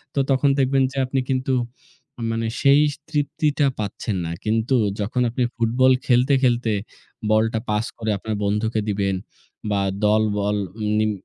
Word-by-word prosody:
তো - - +1
তখন 135 +1 +3
দেখবেন 135 0 +3
যে 135 - -9
আপনি 130 +1 -1
কিন্তু 130 0 0 0.8
মানে 115 0 -1
সেই 140 +1 +6 0.3
তৃপ্তিটা 150 -1 +1
পাচ্ছেন 105 +1 -3
না। 80 - -3
কিন্তু 110 +4 +1 0.3
যখন 125 +5 -1
আপনি 125 +2 -1
ফুটবল 120 +3 +3
খেলতে, 125 +2 +3
খেলতে 120 -2 +2 0.6
বলটা 110 +1 +2
পাস 105 +1 +1
করে 110 -2 -2
আপনার 110 +2 -4
বন্ধুকে 105 +2 0
দিবেন, 100 -1 0 0.6
বা 100 -1 +1 0.2
দলবল 105 -1 +2 0.4
নিম 110 0 +2
115 Hz, 140 wpm, -22 LUFS, 105-130 Hz, 0.8 s, সেই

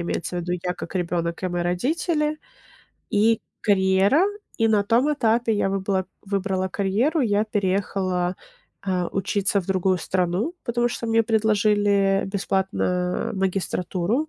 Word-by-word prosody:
Имеется 175 +1 -3
в - - -1
виду: 175 +1 -3
я 180 0 -2
как - - -8
ребенок 170 -1 -2
и 185 - 0
мои 175 0 -2
родители, 300 - 0 0.7
и 220 +2 +3 0.2
карьера. 195 - +3 0.3
И 225 0 +2
на 205 -2 +3
том 250 +8 +3
этапе 230 -3 +1
я 205 -2 +1
выбыла 190 -1 -1 0.2
выбрала 195 -1 -1
карьеру, 215 - +1
я 210 -4 +2
переехала, 190 -3 -1 0.5
а, 185 -3 -1
учиться 195 +1 0
в 175 - -11
другую 185 -1 +1
страну, 185 - -1
потому 240 -1 +1
что 235 -1 -5
мне 225 0 +3
предложили 205 -3 +2
бесплатно 190 -2 -1
магистратуру. 190 - -1
195 Hz, 135 wpm, -24 LUFS, 185-225 Hz, 0.7 s, и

